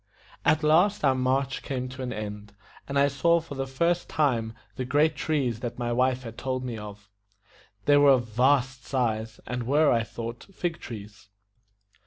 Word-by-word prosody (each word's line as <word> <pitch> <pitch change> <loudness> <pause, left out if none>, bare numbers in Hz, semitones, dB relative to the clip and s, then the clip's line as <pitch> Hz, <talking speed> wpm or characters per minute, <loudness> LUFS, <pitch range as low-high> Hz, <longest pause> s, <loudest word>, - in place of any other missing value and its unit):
At 155 0 +3
last 170 +4 +4
our 135 - +5
march 130 +1 0
came 130 -2 -3
to 130 +1 -8
an 125 -1 -3
end, 105 -1 -6 0.3
and 140 - -2
I 140 0 +5
saw 155 +5 +3
for 160 -3 -9
the 135 -1 -3
first 170 +6 0
time 120 -7 +1 0.2
the 130 - -3
great 150 +5 +2
trees 135 -8 -1
that 120 -1 -5
my 120 -1 -1
wife 130 +1 +1
had 115 -1 -8
told 130 -1 -2
me 120 -2 -4
of. 105 -1 -9 0.8
They 145 0 +6
were 145 -1 +7
of 125 -2 +1
vast 130 +2 +2
size, 110 -4 -2
and 125 +1 -3
were, 150 +2 +4
I 115 - +3
thought, 115 +1 -7
fig 170 -2 -2
trees. 105 -2 -10
130 Hz, 180 wpm, -27 LUFS, 115-145 Hz, 0.8 s, were